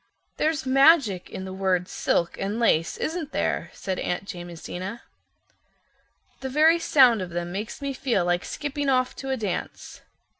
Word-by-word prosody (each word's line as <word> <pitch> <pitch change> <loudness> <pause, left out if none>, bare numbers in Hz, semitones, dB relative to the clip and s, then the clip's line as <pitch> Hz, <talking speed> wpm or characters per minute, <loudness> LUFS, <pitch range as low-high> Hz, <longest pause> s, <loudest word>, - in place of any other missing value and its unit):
"There's 310 -3 0
magic 270 - +4
in 190 - -6
the 190 - -6
words 190 -2 0
'silk' 170 0 0
and 200 +4 -2
'lace,' 165 -8 +2
isn't 320 -2 -3
there?" - - -1
said 190 -1 -4
Aunt 180 +2 -2
Jamesina. 175 +3 -7 1.4
"The 265 - -4
very 315 +5 +4
sound 255 - +5
of 185 - -4
them 175 0 -4
makes 210 +8 -5
me 280 -1 -2
feel 240 -9 0
like 175 0 +1
skipping 290 -1 -3
off 255 -1 +1
to 270 - -6
a 265 - 0
dance. 205 -6 -5
225 Hz, 155 wpm, -25 LUFS, 180-275 Hz, 1.4 s, sound